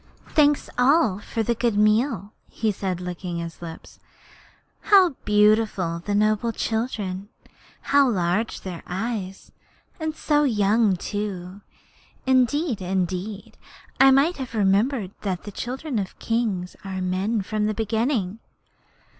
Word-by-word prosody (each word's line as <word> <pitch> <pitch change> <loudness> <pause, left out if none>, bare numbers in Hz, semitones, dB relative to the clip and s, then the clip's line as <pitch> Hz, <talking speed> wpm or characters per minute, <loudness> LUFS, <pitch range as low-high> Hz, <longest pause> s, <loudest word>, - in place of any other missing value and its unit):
'All - - -20
thanks 295 -1 +4 0.6
for 225 - 0
this 235 +1 0
good 230 -4 +1
meal,' 215 -1 +2 0.2
he 220 -1 -1
said, 190 -2 -3
licking 180 -1 -5
his 170 0 -6
lips. 165 -1 -10 0.8
'How 385 -3 +6 0.2
beautiful 210 -1 +3
are 170 0 -2
the 205 +4 -2
noble 215 +2 +2
children! 210 -4 -3 0.5
How 280 -1 +4
large 190 +2 0
are - - -24
their 180 -3 -6
eyes! 195 0 -4 0.5
And 315 -1 -3
so 295 -1 +2
young 215 -4 +3
too! 195 -1 -5 0.6
Indeed, 260 - +2
indeed, 185 +2 -3 0.4
I 270 - +8
might 275 +6 +4
have 255 -4 -6
remembered 205 +1 +2
that 185 -4 -3
the 205 - -7
children 255 +3 -4
of 190 -2 -5
kings 215 -6 -2
are 190 -1 -4
men 190 +4 -1
from 210 +2 -1
the 215 - 0
beginning.' 220 -2 -1
210 Hz, 130 wpm, -24 LUFS, 190-235 Hz, 0.8 s, I